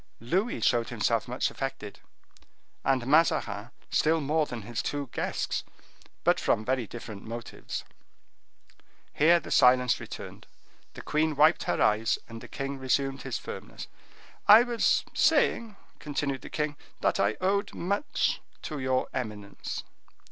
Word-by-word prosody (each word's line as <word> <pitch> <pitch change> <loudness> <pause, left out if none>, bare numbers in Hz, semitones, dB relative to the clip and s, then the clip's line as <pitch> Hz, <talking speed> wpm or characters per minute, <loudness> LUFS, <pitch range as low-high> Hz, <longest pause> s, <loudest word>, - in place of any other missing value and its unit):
Louis 185 - -1
showed 120 -1 +2
himself 115 -1 0
much 125 +1 -1
affected, 135 -6 -5 0.8
and 130 -2 +1
Mazarin 135 -8 +2 0.2
still 160 +1 +3
more 155 +1 +1
than 120 -3 -6
his 115 +2 -3
two 145 -3 -3
guests, - - -2 0.6
but - - +3
from 110 - +1
very 130 -2 0
different 110 -3 -8
motives. 115 +1 -6 1.3
Here 170 +3 +5
the - - -10
silence 125 0 +5
returned. - - -9 0.5
The - - -8
queen 155 0 +1
wiped 155 +4 +4
her - - 0
eyes, 110 +2 +3
and 115 0 -9
the - - -10
king 135 0 -4
resumed 135 +1 0
his 135 -3 -3
firmness. - - -8 0.6
"I 220 +3 +10
was 240 -2 +2
saying," 225 -3 +2 0.2
continued 140 -2 -2
the - - -9
king, 150 -1 -2 0.2
"that - - +1
I 100 +2 +2
owed 200 +2 0
much 200 +10 0 0.2
to 150 -2 -4
your 130 -1 0
eminence." 105 -5 -5
135 Hz, 135 wpm, -28 LUFS, 115-155 Hz, 1.3 s, I